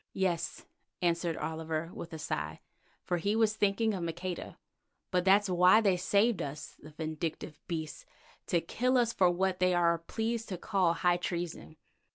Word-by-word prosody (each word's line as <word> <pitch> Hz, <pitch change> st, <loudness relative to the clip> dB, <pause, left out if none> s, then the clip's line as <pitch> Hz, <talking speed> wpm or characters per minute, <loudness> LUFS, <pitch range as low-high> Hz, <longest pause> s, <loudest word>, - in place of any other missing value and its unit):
"Yes," 185 Hz, -3 st, -1 dB, 0.4 s
answered 170 Hz, -1 st, +1 dB
Oliver 160 Hz, +1 st, -3 dB
with 170 Hz, -, -8 dB
a 160 Hz, -, -6 dB
sigh, 80 Hz, -, -4 dB, 0.4 s
for 175 Hz, -, -1 dB
he 200 Hz, +5 st, 0 dB
was 220 Hz, -1 st, +3 dB
thinking 215 Hz, +1 st, +1 dB
of 190 Hz, -, -3 dB
Maqueda, 175 Hz, +2 st, -5 dB, 0.5 s
"but 180 Hz, -1 st, +2 dB
that's 200 Hz, +2 st, +5 dB
why 180 Hz, +3 st, +6 dB
they 200 Hz, -4 st, +3 dB
saved 200 Hz, +2 st, +2 dB
us, 145 Hz, 0 st, -6 dB
the 155 Hz, -, -11 dB
vindictive 155 Hz, 0 st, -5 dB
beasts, 160 Hz, -4 st, -5 dB, 0.4 s
to 170 Hz, -, +2 dB
kill 255 Hz, +9 st, +1 dB
us 235 Hz, -2 st, +2 dB
for 185 Hz, -2 st, +4 dB
what 185 Hz, +1 st, 0 dB
they 185 Hz, 0 st, +3 dB
are 170 Hz, -1 st, +3 dB
pleased 225 Hz, +6 st, -3 dB
to 185 Hz, -, -3 dB
call 180 Hz, -1 st, +1 dB
high 175 Hz, +1 st, +2 dB
treason." 175 Hz, -2 st, -4 dB
175 Hz, 165 wpm, -31 LUFS, 165-195 Hz, 0.5 s, why